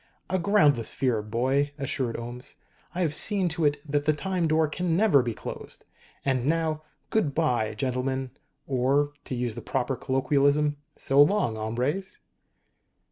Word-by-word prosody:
"A 190 - +2
groundless 150 - +3
fear, 125 -5 0
boy," 130 +7 0
assured 130 -4 -2
Ohms. 120 +2 -7 0.4
"I 180 - -1
have 160 -4 +1
seen 190 +2 +2
to 160 -1 -1
it 145 0 +3
that 145 0 0
the 155 - +4
Time 180 +2 -1
Door 155 0 +2
can 170 +1 -1
never 195 -9 +5
be 120 -3 -3
closed. - - -8 0.4
And 130 -2 +1
now 160 -1 0 0.3
good 160 -11 +1
bye, 120 -9 +1
gentlemen. 130 +2 -2 0.3
Or, 140 +2 +1
to 130 - -4
use 120 -2 -2
the - - -7
proper 135 0 -1
colloquialism 140 +3 +1 0.2
_so 145 +2 +5
long, 200 - 0
hombres! 125 - -2
140 Hz, 150 wpm, -27 LUFS, 125-160 Hz, 0.4 s, never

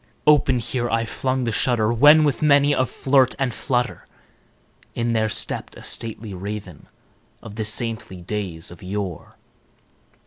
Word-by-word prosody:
Open 145 -4 +4
here 120 0 -2
I 115 0 0
flung 130 +2 -2
the 115 - -1
shutter, 115 -1 +1
when, 150 +6 +7
with 145 -6 0
many 145 -1 +4
a 130 -3 +1
flirt 130 0 +2
and 135 -4 -1
flutter, 125 -2 -2 0.9
In 115 0 -1
there 110 -1 +1
stepped - - -4
a - - -12
stately 110 -2 -3
Raven 95 -3 -7 0.6
of 110 -3 -9
the 110 0 -3
saintly 110 -4 -1
days 90 -5 -4
of 85 - -13
yore. 95 -2 -5
115 Hz, 145 wpm, -22 LUFS, 105-130 Hz, 0.9 s, when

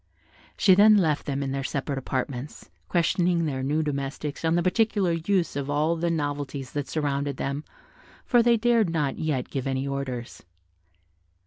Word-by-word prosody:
She 190 - +6
then 210 +3 +7
left 160 -6 +1
them 140 -1 -1
in 135 - -3
their 135 0 -2
separate 140 0 -2
apartments, 130 +1 -5 0.2
questioning 175 0 +1
their 135 -4 -2
new 150 +4 0
domestics 145 +1 -4
on 165 +1 +2
the 175 - +2
particular 200 -1 +2
use 170 0 0
of 140 -1 -3
all 150 +3 +1
the 170 +1 -1
novelties 145 -4 -3
that 145 -2 -3
surrounded 140 -2 -2
them, 140 +2 -3 0.6
for 240 -2 +4
they 235 0 +4
dared 230 -3 +3
not 150 -4 -1
yet 150 -6 -2
give 135 -1 -3
any 135 0 -1
orders. 130 -3 -5
150 Hz, 160 wpm, -26 LUFS, 140-170 Hz, 0.6 s, then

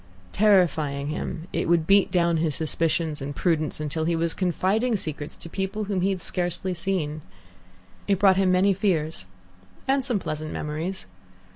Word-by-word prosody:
Terrifying 160 -9 +2
him, 160 +2 -4
it - - -1
would 170 -2 +3
beat 195 +2 +4
down 170 -2 +2
his 155 -3 0
suspicions 160 -1 -1
and 140 +1 -5
prudence 160 -3 0
until 155 +1 -2
he 170 0 +1
was 165 0 0
confiding 195 +6 +1
secrets 155 -6 -5
to - - -9
people 195 +4 -3
whom 200 -3 -1
he 190 - +2
had 190 -2 -2
scarcely 175 +1 0
seen. 170 -4 -2 0.9
It 200 -1 +3
brought 195 0 +5
him 190 -1 +3
many 190 +2 +4
fears 160 - -1 0.6
and 270 0 +2
some 245 -4 0
pleasant 155 -4 -4
memories. 160 +6 -4
170 Hz, 160 wpm, -25 LUFS, 155-195 Hz, 0.9 s, brought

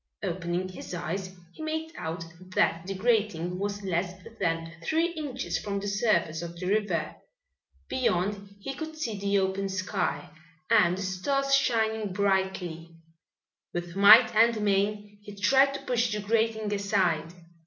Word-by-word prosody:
Opening 180 0 -2
his 185 -1 -7
eyes 185 +2 -4 0.2
he - - -11
made 315 +1 -3
out 165 +2 -4 0.3
that 165 +2 +2
the 195 - -3
grating 190 -5 0
was 205 0 -3
less 180 -1 -1 0.3
than 165 0 -1
three 325 - +1
inches 265 - -3
from 200 -1 -3
the 200 - -5
surface 200 -6 +1
of 170 0 -7
the 180 - -4
river. 195 -4 0 0.7
Beyond 200 -4 -1
he 270 +7 -5
could 315 +2 -7
see 225 -10 -3
the 200 0 +1
open 195 0 0
sky 185 -1 -2 0.4
and 185 -6 +5
the 195 - -3
stars 275 +10 0
shining 220 -6 +2
brightly. 190 -4 -1 0.8
With 175 0 -4
might 215 +4 +8
and 230 0 +5
main 205 0 0
he 205 0 -10
tried 270 +7 +4
to - - -5
push 240 -2 +1
the 210 - -1
grating 220 0 0
aside. 185 -5 0
200 Hz, 145 wpm, -28 LUFS, 180-220 Hz, 0.8 s, might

